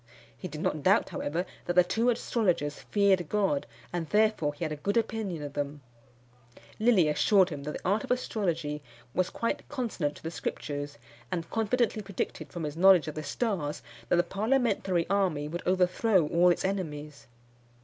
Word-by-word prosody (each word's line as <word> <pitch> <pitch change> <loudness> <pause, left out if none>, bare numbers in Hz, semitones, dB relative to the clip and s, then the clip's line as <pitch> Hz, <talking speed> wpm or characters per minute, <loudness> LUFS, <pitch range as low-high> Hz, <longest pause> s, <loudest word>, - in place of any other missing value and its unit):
He 150 - -6
did 155 -3 -7
not 155 - -1
doubt, 195 +8 +3
however, 165 +5 -2 0.2
that 175 - 0
the 180 - +7
two 225 +7 +1
astrologers 190 -11 0
feared 195 -5 +3
God, 195 -9 +1 0.3
and 170 -3 -3
therefore 210 -9 +2
he 170 - -3
had 155 - -3
a - - -2
good 200 +9 -1
opinion 215 -8 -1
of 145 -1 -6
them. 145 0 -3 1.0
Lilly 215 -7 +4
assured 185 +6 +4
him 145 -4 -6
that 150 - -3
the - - -5
art 205 +3 +2
of - - -8
astrology 170 -11 -1 0.3
was 185 0 +1
quite 230 - -3
consonant 225 - -2
to - - -14
the 165 - -4
Scriptures; 145 -3 -4 0.3
and 165 -2 -2
confidently 225 0 +1
predicted 200 -2 -4
from 170 -2 -5
his 150 -1 -3
knowledge 185 -1 +6
of 155 - -3
the 155 - -4
stars, 155 -1 -2 0.3
that - - +4
the 175 - +4
parliamentary 200 -3 +1
army 180 -7 +1
would 170 +3 -4
overthrow 185 +1 +3
all 175 +1 +5
its 175 - +1
enemies. 150 -7 -4
180 Hz, 175 wpm, -29 LUFS, 150-205 Hz, 1.0 s, the